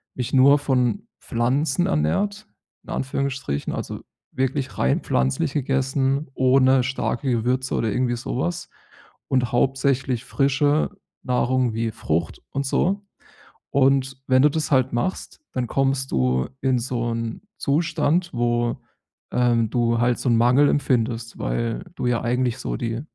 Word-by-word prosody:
mich 125 Hz, 0 st, -4 dB
nur 140 Hz, +2 st, +6 dB
von 125 Hz, -5 st, 0 dB
Pflanzen 135 Hz, +8 st, 0 dB
ernährt, 200 Hz, -, 0 dB, 0.4 s
in -, -, -18 dB
Anführungsstrichen, 135 Hz, -, -2 dB
also -, -, -5 dB, 0.3 s
wirklich 135 Hz, +1 st, -2 dB
rein 65 Hz, -, +2 dB
pflanzlich 65 Hz, -, 0 dB
gegessen, 135 Hz, +1 st, 0 dB
ohne 130 Hz, 0 st, +4 dB
starke 130 Hz, 0 st, -2 dB
Gewürze 125 Hz, +3 st, 0 dB
oder 115 Hz, -, 0 dB
irgendwie 120 Hz, +2 st, 0 dB
sowas 170 Hz, +9 st, -3 dB, 0.6 s
und 125 Hz, -2 st, +1 dB
hauptsächlich 135 Hz, -1 st, +1 dB
frische 145 Hz, +3 st, +2 dB, 0.3 s
Nahrung 125 Hz, -1 st, +1 dB
wie 115 Hz, 0 st, -1 dB
Frucht 85 Hz, -6 st, -2 dB
und 140 Hz, 0 st, -2 dB
so. 195 Hz, +9 st, +1 dB, 0.7 s
Und 135 Hz, -1 st, +2 dB
wenn 130 Hz, 0 st, +4 dB
du 150 Hz, -, +5 dB
das 155 Hz, 0 st, -2 dB
halt 130 Hz, -2 st, +3 dB
machst, 155 Hz, -, -3 dB
dann 125 Hz, -2 st, -1 dB
kommst 135 Hz, +1 st, 0 dB
du 65 Hz, 0 st, +1 dB
in 130 Hz, -2 st, +2 dB
so 120 Hz, 0 st, -2 dB
'n 115 Hz, -1 st, -4 dB, 0.2 s
Zustand, 165 Hz, +3 st, +1 dB
wo, 120 Hz, 0 st, 0 dB, 0.5 s
ähm, 120 Hz, -3 st, +2 dB
du 115 Hz, -2 st, +1 dB
halt 120 Hz, 0 st, +2 dB
so 130 Hz, -, -2 dB
'n 115 Hz, -, +4 dB
Mangel 125 Hz, +5 st, +4 dB
empfindest, 120 Hz, -4 st, 0 dB
weil 115 Hz, +7 st, -2 dB
du -, -, -2 dB
ja 120 Hz, -1 st, +1 dB
eigentlich 125 Hz, 0 st, 0 dB
so -, -, -3 dB
die 115 Hz, +1 st, -3 dB
130 Hz, 135 wpm, -23 LUFS, 120-135 Hz, 0.7 s, nur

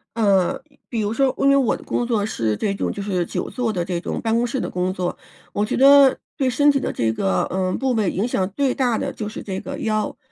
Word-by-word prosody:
嗯， 195 Hz, -5 st, +2 dB, 0.3 s
比 230 Hz, -, -2 dB
如 210 Hz, 0 st, -1 dB
说 270 Hz, +2 st, +2 dB
因 -, -, +2 dB
为 275 Hz, -, +5 dB
我 265 Hz, -4 st, +2 dB
的 -, -, -15 dB
工 240 Hz, -, -1 dB
作 225 Hz, -4 st, 0 dB
是 110 Hz, -, -1 dB
这 200 Hz, -2 st, -1 dB
种 -, -, -2 dB
就 200 Hz, -, -6 dB
是 185 Hz, -3 st, -1 dB
久 -, -, -4 dB
坐 245 Hz, -3 st, -1 dB
的 175 Hz, -4 st, -2 dB
这 175 Hz, -1 st, -2 dB
种 -, -, -3 dB
办 225 Hz, -1 st, 0 dB
公 235 Hz, +1 st, +2 dB
室 245 Hz, +2 st, -2 dB
的 -, -, -3 dB
工 180 Hz, +1 st, -1 dB
作， 180 Hz, -1 st, -3 dB, 0.4 s
我 205 Hz, +1 st, 0 dB
觉 -, -, -2 dB
得 275 Hz, 0 st, +7 dB, 0.2 s
对 265 Hz, -2 st, +1 dB
身 285 Hz, +4 st, +3 dB
体 280 Hz, -1 st, +3 dB
的 -, -, -2 dB
这 110 Hz, -1 st, 0 dB
个， 95 Hz, -4 st, 0 dB
呃， 185 Hz, 0 st, -1 dB
部 260 Hz, -1 st, 0 dB
位 215 Hz, -5 st, +1 dB
影 205 Hz, +6 st, -1 dB
响 190 Hz, -5 st, -1 dB
最 270 Hz, +3 st, 0 dB
大 245 Hz, -4 st, +1 dB
的 -, -, -3 dB
就 210 Hz, -1 st, -5 dB
是 215 Hz, -, -7 dB
这 190 Hz, -2 st, -5 dB
个 -, -, -6 dB
腰， 215 Hz, -1 st, -1 dB
215 Hz, 280 characters per minute, -22 LUFS, 185-250 Hz, 0.4 s, 得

